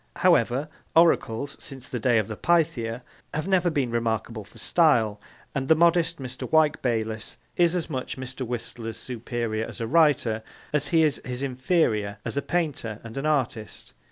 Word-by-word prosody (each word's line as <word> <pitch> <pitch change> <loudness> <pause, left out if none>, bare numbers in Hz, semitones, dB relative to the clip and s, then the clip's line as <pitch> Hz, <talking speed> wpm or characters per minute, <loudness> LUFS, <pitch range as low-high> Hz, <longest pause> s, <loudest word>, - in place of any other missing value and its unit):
However, 145 -6 +3 0.3
oracles, 140 -5 +3
since 135 -2 -9
the 125 - -4
days 115 -1 +3
of 100 - -8
the 110 - -5
Pythia, 125 -7 +1 0.3
have 155 +4 -2
never 185 -2 +3
been 140 -7 0
remarkable 115 -1 -1
for - - -18
style, 115 -11 +3 0.3
and 135 -1 -2
the 160 - +6
modest 170 0 +3
Mr. 130 -2 -7
Wyke 155 -2 +4
Bayliss 110 -3 -2 0.2
is 175 0 +3
as 175 - -1
much 130 -4 -4
Mr. 130 0 -7
Whistler's 115 -2 -5
superior 120 -2 -3
as - - -9
a 115 - -1
writer 135 -6 +3 0.3
as 150 -1 +1
he 160 +2 +4
is 150 -2 +1
his 125 +1 -4
inferior 125 - +1
as - - -3
a 140 - +1
painter 145 -12 -2
and 115 -1 -9
an 135 +2 -1
artist. 130 -7 -2
130 Hz, 170 wpm, -26 LUFS, 115-155 Hz, 0.3 s, the